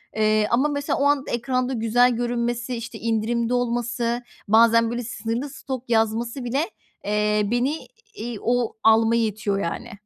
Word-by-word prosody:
eee, 215 -1 +2
ama, 265 +5 +3
mesela, 285 -1 -1
o 280 - +2
anda 285 -1 +1
ekranda 255 +2 -1
güzel 245 +2 +3
görünmesi, 240 +1 -2
işte, 230 0 -7
indirimde 230 +1 0
olması, 240 0 -1 0.2
bazen 230 +1 +5
böyle 240 0 -3
sınırlı 230 +4 -3
stok 260 -2 -7
yazması 230 +3 0
bile, 265 +5 0 0.4
eee, 210 0 +1
beni, 260 +6 -1 0.3
iii, 225 -1 -5
o 245 -1 0
almaya 225 +1 +4
itiyor, 205 -1 -2
yani. 170 - -4
235 Hz, 145 wpm, -23 LUFS, 225-245 Hz, 0.4 s, bazen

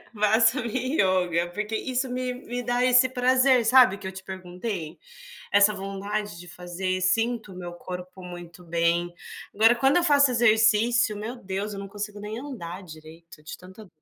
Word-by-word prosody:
Faço 225 +4 +3
minha 255 +5 -1
yoga, 180 -2 +1
porque 210 +3 -4
isso 255 +3 -2
me 250 0 -3
me 245 0 -6
dá 245 +1 0
esse 255 0 +5
prazer, 255 -1 +3
sabe, 245 -4 +5
que 195 - -12
eu 190 - -4
te 190 0 -10
perguntei? 180 -2 -6 0.5
Essa 205 +1 +5
vontade 200 0 -5
de 175 - -12
fazer, 180 +2 -4
sinto 225 +3 0
o - - -14
meu 175 -1 -7
corpo 180 +1 -9
muito 175 0 -10
bem. 170 +1 0 0.4
Agora, 225 +3 +5
quando 270 +6 +3
eu 350 - +2
faço 285 -4 +4
exercício, 225 -1 +3
meu 220 +4 -6
Deus, 200 -2 -5
eu 195 - -7
não 200 - -7
consigo 205 +1 -7
nem 210 +2 -6
andar 215 -10 -7
direito 160 -1 -14
de 155 - -8
tanta 190 +3 -14
210 Hz, 170 wpm, -25 LUFS, 180-245 Hz, 0.5 s, esse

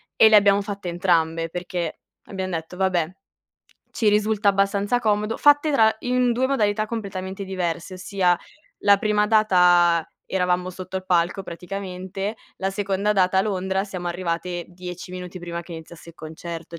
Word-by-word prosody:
E 220 - +7
le 220 - +6
abbiamo 200 0 +4
fatte 200 -2 -6
entrambe, 165 -2 +1
perché 175 -1 -4 0.2
abbiam 190 -1 -5
detto: 165 +1 -5
"Vabbè, 180 -3 +1 0.8
ci 220 - +1
risulta 210 0 +2
abbastanza 200 +3 +2
comodo". 210 -1 0
Fatte 290 +1 +4
tra 220 -6 +4
in 250 -1 +1
2 250 +2 +1
modalità 215 -5 +1
completamente 195 -3 -5
diverse. 185 -1 -3
Ossia, 185 -1 +1 0.4
la 200 0 +5
prima 210 0 +2
data 180 -6 +4 0.2
eravamo 180 -1 0
sotto 185 +1 -7
il 185 - -5
palco, 180 +2 +1
praticamente. 190 +3 -5 0.2
La 195 0 -2
seconda 200 +1 0
data 190 -2 +2
a - - +4
Londra 190 -1 -1
siamo 185 -3 -5
arrivate, 175 0 -3
10 180 0 -8
minuti 180 0 -7
prima 170 -1 -5
che 170 - -11
iniziasse 165 +1 -11
il - - -21
concerto. 165 +1 -8
190 Hz, 155 wpm, -23 LUFS, 175-205 Hz, 0.8 s, E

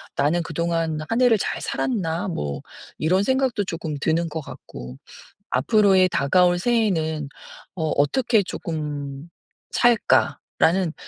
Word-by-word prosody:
'나는 155 +5 +1
그동안 165 -1 -1
한 230 +3 +1
해를 240 -3 +5
잘 - - -3
살았나?' 180 -8 -2
뭐 75 - -4 0.4
이런 185 +5 +2
생각도 260 -4 +1
쪼끔 160 -4 -4
드는 165 +1 +1
것 160 +1 -4
같고 65 - -10 0.5
'앞으로의 190 - +4
다가올 175 +5 +3
새해에는 165 - 0 0.5
어 160 -3 -2
어떻게 220 - +2
쪼끔 150 -4 -5 0.4
살까?'라는 190 -6 +2
170 Hz, 250 characters per minute, -23 LUFS, 155-200 Hz, 0.5 s, 해를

